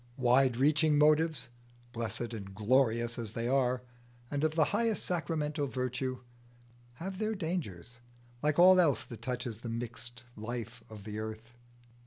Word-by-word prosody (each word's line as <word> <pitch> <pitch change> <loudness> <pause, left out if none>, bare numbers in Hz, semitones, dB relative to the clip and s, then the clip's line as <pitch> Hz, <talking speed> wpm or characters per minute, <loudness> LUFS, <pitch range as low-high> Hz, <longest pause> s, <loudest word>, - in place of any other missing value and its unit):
Wide 130 -1 +4
reaching 150 +2 +4
motives, 150 -3 +3 0.4
blessed 115 0 -3
and 100 -3 -7
glorious 120 +1 +2
as 110 -2 -4
they 115 +1 -2
are, 125 -1 +1 0.5
and 145 0 -1
of 155 0 +1
the 160 - +5
highest 225 0 +1
sacramental 155 -4 -1
virtue, 130 +1 -3 0.7
have 185 +6 -6
their 220 0 0
dangers, 120 - -4 0.4
like 150 0 +1
all 185 +1 +8
else 145 -7 +2
that 120 - -10
touches 125 -4 -4
the 115 - -6
mixed 120 +1 -4
life 115 +1 -6
of 105 -2 -10
the 105 +1 -5
earth. 110 +2 -6
125 Hz, 145 wpm, -32 LUFS, 115-150 Hz, 0.7 s, all